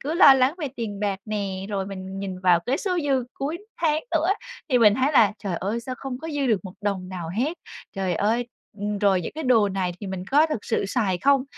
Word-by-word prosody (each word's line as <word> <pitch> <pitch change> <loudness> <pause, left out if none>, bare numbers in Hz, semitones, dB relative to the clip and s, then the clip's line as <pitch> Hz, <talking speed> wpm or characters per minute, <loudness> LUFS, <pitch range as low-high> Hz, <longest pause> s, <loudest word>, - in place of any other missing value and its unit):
cứ 300 +4 -3
lo 295 -7 +9
lắng 265 +3 +3
về 300 -5 -2
tiền 210 -4 -4
bạc 200 -2 -1
nè, 200 -3 -3
rồi 195 -2 -2
mình 190 -1 -7
nhìn 190 -2 -4
vào 180 -2 +4
cái 260 - +2
số 365 -3 -1
dư 270 -3 +1
cuối 300 +5 -3 0.2
tháng 310 -1 +1
nữa 325 +1 +1 0.4
thì 250 -4 +4
mình 210 -3 +6
thấy 265 +5 +1
là 215 -7 +5
"Trời 190 -4 -3
ơi, 210 +7 -2
sao 255 +2 -5
không 265 -2 -5
có 320 +4 -7
dư 290 -3 -1
được 215 -6 +2
một 185 -1 -8
đồng 195 -3 -2
nào 180 -3 -5
hết, 260 - -1 0.3
trời 190 -3 -1
ơi", 225 +6 +1 0.3
ừm, 205 0 -2
rồi: 195 -3 +3
"Những - - -5
cái 315 0 -4
đồ 230 -5 +4
này 190 -2 -1
thì 200 - -6
mình 190 -1 -5
có 295 +4 +5
thực 300 -10 -4
sự - - 0
xài 195 -4 0
không?" 275 +4 +3
215 Hz, 245 wpm, -24 LUFS, 195-275 Hz, 0.4 s, lo